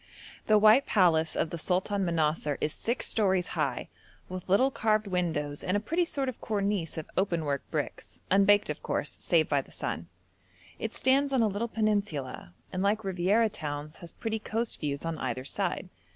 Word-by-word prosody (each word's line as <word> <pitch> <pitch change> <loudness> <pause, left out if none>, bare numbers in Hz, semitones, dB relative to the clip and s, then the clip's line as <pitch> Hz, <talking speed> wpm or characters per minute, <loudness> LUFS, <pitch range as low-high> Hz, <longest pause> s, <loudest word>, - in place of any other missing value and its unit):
The 215 - +6
white 215 +6 +6
palace 165 -5 +3
of 160 - 0
the 170 - -4
Sultan 190 +4 0
Manassar 155 -3 0
is 150 - 0
six 235 +3 -2
stories 190 -4 +1
high, - - -1 0.4
with 185 0 -7
little 255 +8 +4
carved 215 -3 +1
windows 160 -6 -2
and 185 +3 +1
a - - +1
pretty 330 - 0
sort 275 -4 -2
of 255 - -5
cornice 200 -6 -1
of 160 - -5
open 170 -4 0
work 140 -2 -1
bricks, - - -4
unbaked 200 +1 +5
of - - -7
course, - - -3
save - - +3
by - - +2
the - - -19
sun. - - -4 0.7
It - - -4
stands 275 +2 +3
on 260 -4 +3
a - - +4
little 210 +3 -2
peninsula, 205 - -2 0.2
and 185 - -1
like 210 +3 +1
Riviera 195 +4 +2
towns, 150 -5 -5
has 170 - -10
pretty 220 -1 -3
coast 225 +2 -2
views 145 0 -3
on 165 -1 -3
either 130 0 -3
side. - - -1
195 Hz, 180 wpm, -29 LUFS, 160-215 Hz, 0.7 s, The